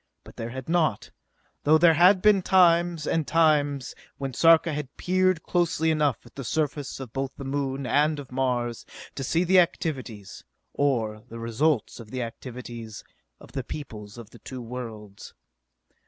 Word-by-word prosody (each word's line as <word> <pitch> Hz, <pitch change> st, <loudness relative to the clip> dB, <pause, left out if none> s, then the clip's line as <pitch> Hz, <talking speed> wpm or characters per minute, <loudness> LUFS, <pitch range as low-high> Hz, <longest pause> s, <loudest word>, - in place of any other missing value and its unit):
But -, -, -15 dB
there 115 Hz, -, -5 dB
had 130 Hz, +1 st, -7 dB
not, 160 Hz, -10 st, 0 dB, 0.5 s
though 155 Hz, +2 st, +5 dB
there 165 Hz, 0 st, +6 dB
had 180 Hz, +4 st, +5 dB
been 210 Hz, -2 st, +5 dB
times 175 Hz, -3 st, +3 dB
and 160 Hz, -1 st, 0 dB
times 145 Hz, -5 st, +2 dB, 0.2 s
when 135 Hz, -2 st, -4 dB
Sarka 165 Hz, +3 st, +5 dB
had 145 Hz, -2 st, -6 dB
peered 185 Hz, -2 st, +1 dB
closely 165 Hz, -2 st, +1 dB
enough 150 Hz, -7 st, 0 dB
at 120 Hz, -, -16 dB
the 135 Hz, -, -7 dB
surface 145 Hz, +1 st, -2 dB
of 130 Hz, -4 st, -8 dB
both 135 Hz, 0 st, -3 dB
the 140 Hz, -, -7 dB
Moon 135 Hz, 0 st, -2 dB
and 150 Hz, +3 st, +2 dB
of 140 Hz, -3 st, -9 dB
Mars 125 Hz, -2 st, -1 dB, 0.3 s
to 135 Hz, -, -5 dB
see 165 Hz, +7 st, +1 dB
the 185 Hz, +1 st, +5 dB
activities, 130 Hz, -, -2 dB, 0.3 s
or 115 Hz, -7 st, 0 dB
the 115 Hz, -, -8 dB
results 115 Hz, +3 st, 0 dB
of 115 Hz, -2 st, -11 dB
the 125 Hz, +1 st, -3 dB
activities, 115 Hz, -2 st, -8 dB, 0.4 s
of -, -, -15 dB
the 135 Hz, -2 st, -4 dB
peoples 110 Hz, -7 st, -8 dB
of 115 Hz, -3 st, -11 dB
the -, -, -15 dB
two 130 Hz, -, -8 dB
worlds. 110 Hz, -4 st, -8 dB
140 Hz, 165 wpm, -26 LUFS, 120-160 Hz, 0.5 s, there